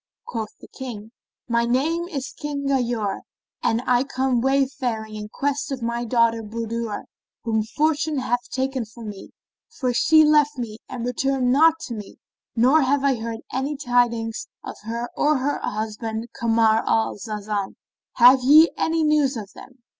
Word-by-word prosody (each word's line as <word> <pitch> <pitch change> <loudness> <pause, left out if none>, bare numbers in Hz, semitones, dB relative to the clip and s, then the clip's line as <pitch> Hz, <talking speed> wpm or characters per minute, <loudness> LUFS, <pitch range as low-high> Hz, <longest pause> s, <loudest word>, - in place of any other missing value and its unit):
Quoth 225 -3 -5
the - - -13
King, 225 -5 -8 0.4
"My 235 -1 +2
name 305 +9 0
is 275 -6 -5
King 290 -1 -5
Ghayur 240 -7 0 0.4
and 235 +1 +1
I 245 0 +3
come 260 -2 0
wayfaring 260 -5 0
in 210 0 -6
quest 285 +4 -2
of 260 -3 -4
my 235 +1 -2
daughter 230 -1 +2
Budur 230 0 -4 0.4
whom 225 -2 +1
fortune 300 +6 0
hath 245 -2 -1
taken 265 -1 -2
from 220 0 -9
me, 200 -2 -9 0.4
for 255 - -2
she 315 +5 +5
left 300 -1 +4
me 225 -3 -5
and 250 -3 -5
returned 255 0 0
not 315 +4 +5
to 245 - -5
me, 210 -3 -8 0.4
nor 260 +7 +5
have 275 +1 +1
I 280 -1 +4
heard 225 0 -5
any 275 +3 -2
tidings 240 -4 0 0.2
of - - -7
her 235 +2 -3
or 300 +1 +2
of 260 - -1
her 290 +2 -1
husband 220 +2 -4
Kamar 225 -1 +2
al 225 -1 +1
Zaman. 210 -2 -4 0.4
Have 250 +2 +7
ye 305 +6 +7
any 325 0 0
news 295 -4 +2
of 210 -2 -8
them?" 255 -2 -15
245 Hz, 160 wpm, -23 LUFS, 225-275 Hz, 0.4 s, Have